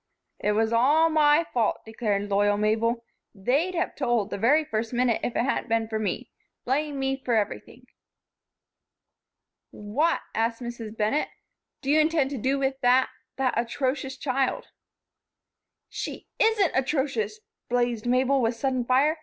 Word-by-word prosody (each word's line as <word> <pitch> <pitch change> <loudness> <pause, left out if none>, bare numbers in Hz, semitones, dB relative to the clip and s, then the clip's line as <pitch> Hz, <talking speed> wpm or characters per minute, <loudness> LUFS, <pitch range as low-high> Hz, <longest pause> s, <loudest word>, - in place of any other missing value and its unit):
"It 210 - +1
was 220 +2 +1
all 300 +8 +4
my 305 +1 +4
fault," 230 -4 +1
declared 210 -2 -2
loyal 205 +1 +3
Mabel. 225 +3 0 0.3
"They'd 280 - 0
have 345 +2 -1
told, 240 -6 0
the - - -2
very 295 +9 +4
first 225 -1 -3
minute, 245 -1 +1
if 240 - -2
it - - +2
hadn't 260 -2 -1
been 225 0 +1
for 220 -1 -3
me. 215 - -3 0.3
Blame 285 +3 -1
me 270 0 -1
for 240 - +1
everything." 210 -2 -3 1.8
"What," 255 +11 0
asked 230 +1 0
Mrs. 235 -3 -7
Bennett, 215 +8 0 0.5
"do 275 - 0
you 310 - +5
intend 310 -3 +2
to 275 - -4
do 265 +5 +1
with 270 0 -1
that 250 +1 +4 0.3
that 265 -2 +1
atrocious 260 +3 -2
child?" 265 -1 -1 1.2
"She - - -6
isn't 435 -5 +3
atrocious!" 260 -6 -1 0.3
blazed 240 -2 0
Mabel, 260 +2 +3
with 230 0 +1
sudden 255 +1 -1
fire. 275 +6 +2
250 Hz, 145 wpm, -26 LUFS, 225-275 Hz, 1.8 s, you